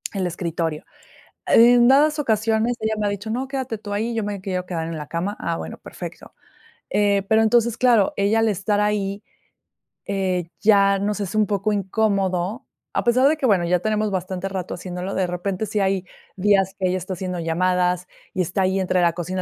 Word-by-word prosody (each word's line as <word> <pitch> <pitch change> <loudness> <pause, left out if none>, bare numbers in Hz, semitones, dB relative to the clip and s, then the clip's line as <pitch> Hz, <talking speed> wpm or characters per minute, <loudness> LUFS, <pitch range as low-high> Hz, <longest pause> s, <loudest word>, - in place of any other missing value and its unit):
el 190 -2 -1
escritorio". 165 -2 -3 0.6
En 240 +1 +6
dadas 300 +3 +4
ocasiones, 225 -1 +1
ella 220 0 0
me 205 - 0
ha - - +1
dicho: 205 +2 -5
"No, 260 +3 -2
quédate 265 -4 -3
tú 205 -1 -6
ahí, 225 +3 -1
yo 225 - -1
me 205 -2 -4
quiero 185 -1 -3
quedar 165 -2 -3
en 165 - -5
la 150 -1 -7
cama". 185 +5 -3
Ah, 165 - -2
bueno, 80 - -7
perfecto. - - -9 0.6
Eh, 200 -1 +2
pero 220 0 +4
entonces, 235 +1 +3
claro, 235 -6 +4
ella 205 +3 +2
al 225 - +3
estar 205 +1 0
ahí, 205 -1 -1 0.8
eh, 185 -3 -1
ya 200 -1 +4
nos 205 +1 -1
es 200 +1 -4
un 215 -1 +3
poco 205 +1 0
incómodo, 195 0 0 0.3
a - - 0
pesar 255 +3 +4
de 310 - +2
que, 275 - -1
bueno, 195 -6 +3
ya 180 +1 +2
tenemos 215 +1 0
bastante 185 0 -3
rato 190 -2 -4
haciéndolo, 180 +1 -5
de 190 - +1
repente, 185 +4 -3
sí 210 +1 -2
hay 190 -1 +1 0.3
días 195 0 +2
que 185 -2 +1
ella 185 - 0
está 185 +2 -6
haciendo 180 0 -4
llamadas 180 +2 0 0.3
y 185 - -1
está 180 +3 -1
ahí 190 +1 +1
entre 185 -1 +1
la 170 -1 +3
cocina 180 +2 -3
195 Hz, 200 wpm, -22 LUFS, 180-220 Hz, 0.8 s, En